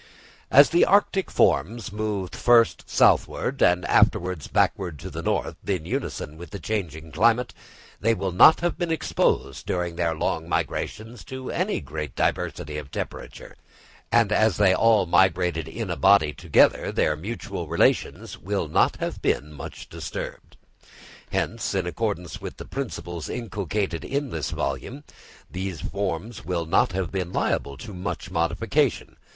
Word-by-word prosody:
As 140 +1 +7
the 170 - +5
arctic 195 -1 +3
forms 110 - +1
moved 105 -3 -3
first 120 -1 +3
southward - - +2
and 90 0 +4
afterwards 90 -5 +2
backward 90 -6 0
to - - -8
the - - -5
north, - - -1
in 90 -5 -1
unison 75 -2 -4
with 85 +1 -10
the 100 - -6
changing 80 -6 -4
climate, 115 - +2 0.5
they 115 +2 +2
will 95 -3 -2
not 95 - +7
have 175 +2 -1
been 175 -2 -1
exposed 160 - 0
during 90 -2 -2
their 85 -2 0
long 80 +1 -2
migrations 110 +5 -3
to 130 -1 -6
any 185 +5 -1
great 75 -4 -6
diversity 75 +1 -1
of 70 -2 -10
temperature; - - -7 0.6
and 115 -3 +4
as 110 -2 +3
they 100 -3 +5
all 110 -1 +4
migrated 90 -2 +2
in 110 -5 -5
a - - -1
body 75 0 +4
together, 85 -2 +3
their 75 - +1
mutual 100 +10 -5
relations - - 0
will - - -2
not - - +2
have - - -4
been 75 +2 -1
much 75 - -9
disturbed. - - -7 0.7
Hence, 115 -2 -2
in 95 -2 0
accordance 90 -3 -3
with - - -7
the - - -8
principles 85 - -5
inculcated 100 -6 -3
in 140 -2 -2
this 80 -2 -3
volume, 95 - -4 0.5
these 95 -2 -4
forms 100 +2 -4
will 85 -2 -2
not 80 +3 +2
have 90 -3 -2
been 90 -3 -3
liable 70 -5 -1
to 100 +9 -9
much 90 0 -5
modification. 85 -1 0
95 Hz, 150 wpm, -25 LUFS, 85-115 Hz, 0.7 s, As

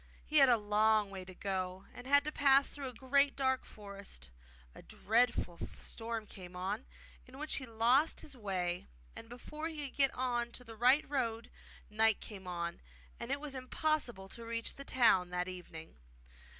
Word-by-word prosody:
He 305 - +1
had 275 -2 +8
a 240 - +6
long 210 0 +3
way 190 -1 -6
to 185 0 -11
go, 185 -1 -3
and 245 - -10
had 285 +1 +6
to 300 - -3
pass 275 -1 +5
through 280 -2 -6
a - - -4
great 280 +3 +2
dark 260 -1 +1
forest. 200 - -10 0.4
A - - -12
dreadful 220 -6 +1 0.2
storm 225 -1 -4
came 180 -3 -11
on, 195 +6 -3 0.4
in 255 +1 -13
which 305 +2 -2
he 260 - -5
lost 240 +7 +3
his 290 - -8
way, 185 -6 -2 0.3
and 225 - -10
before 300 +6 -6
he 300 -3 -4
could - - -20
get 275 -1 +5
on 240 -2 -1
to 250 - -9
the 225 -2 -10
right 250 +6 +4
road 235 -5 -2 0.4
night 220 0 +3
came 195 -4 -9
on, 170 -1 -4 0.4
and 235 - -6
it 280 - 0
was 295 -2 -5
impossible 255 -5 -1
to 230 - -8
reach 230 0 -3
the 275 - -9
town 225 -10 +4
that 180 0 -2
evening. 170 -3 -9
230 Hz, 180 wpm, -34 LUFS, 195-270 Hz, 0.4 s, had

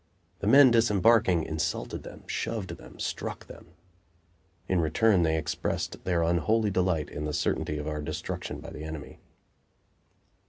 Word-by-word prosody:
The 100 - -3
men 135 +2 +8
disembarking 110 -5 +4
insulted 80 -1 -3
them, - - -11
shoved 95 -7 -3
them, - - -14
struck - - -4
them. - - -13 1.0
In 90 -2 +2
return 95 +5 +3
they 80 -1 +2
expressed 80 - -3
their 85 -2 +1
unholy 95 +6 +2
delight 90 -5 +1
in 75 - -4
the 75 - -3
certainty 75 - -1
of 75 0 -5
our 75 -1 -3
destruction 75 +1 -5
by - - -9
the 75 - -8
enemy. 80 -2 -8
85 Hz, 145 wpm, -28 LUFS, 80-105 Hz, 1.0 s, men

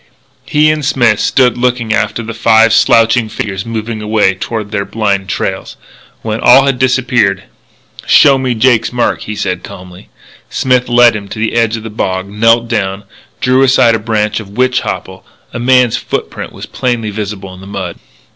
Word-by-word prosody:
He 150 +1 +3
and 155 -1 -3
Smith 120 -6 +2
stood 125 -2 +2
looking 120 -2 0
after 110 +1 -1
the 115 +1 -6
five 115 0 +3
slouching 115 0 +3
figures 95 -1 -5
moving 110 -1 -4
away 105 -2 +1
toward 105 +2 -5
their 100 -2 -1
blind 100 -3 -2
trails. - - -4 0.5
When 110 0 -3
all 130 +3 +6
had 135 -2 0
disappeared: 120 -7 +1 0.6
"Show 135 -2 +5
me 130 -2 -1
Jake's 115 0 +2
mark," 120 -1 -1
he 105 - -6
said 90 -3 -3
calmly. 90 0 -12 0.4
Smith 125 -1 0
led 120 -1 +5
him 100 -1 -6
to 100 - -8
the 110 0 -2
edge 115 -1 +1
of 110 - -9
the 110 - -7
bog, 95 -3 -3
knelt 115 +3 +2
down, 100 -3 -2 0.4
drew 130 +1 +2
aside 130 -3 +4
a 115 - 0
branch 105 0 -1
of 100 -1 -11
witch 130 0 +2
hopple. - - -6 0.3
A - - -4
man's 125 -1 +3
footprint - - -5
was - - -9
plainly 120 -4 -3
visible 100 -2 -6
on 95 0 -12
the 95 - -12
mud. 95 -4 -6
115 Hz, 175 wpm, -12 LUFS, 105-125 Hz, 0.6 s, all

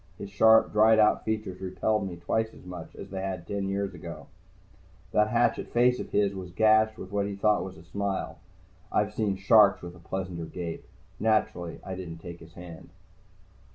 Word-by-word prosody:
His 100 - -8
sharp, 110 +3 +5
dried 110 +1 +5
out 105 -1 +3
features 105 -4 -3
repelled 100 +2 -1
me 90 - -6
twice 110 +6 -2
as - - -15
much 90 -3 -9
as - - -10
they 95 -1 -4
had 95 -3 -4
ten 100 +1 -3
years 100 0 -2
before. 85 -2 -9 0.9
That 105 0 +3
hatchet 120 +2 +1
face 125 +1 +3
of - - -6
his 100 -1 +1
was 95 -2 -7
gashed 110 +3 +3
with 95 - -9
what 100 0 0
he 100 - -4
thought 105 +1 +2
was 95 -3 -8
a 80 - -13
smile. 100 +3 -3 0.5
I've 105 0 +1
seen 105 -3 0
sharks 100 0 +5
with 85 0 -8
a - - -15
pleasanter 90 -1 -5
gape. 85 0 -6 0.3
Naturally, 105 -6 0
I 95 - -6
didn't 90 -3 -7
take 85 +1 -9
his 80 0 -15
hand. 85 -2 -11
95 Hz, 190 wpm, -28 LUFS, 90-105 Hz, 0.9 s, sharp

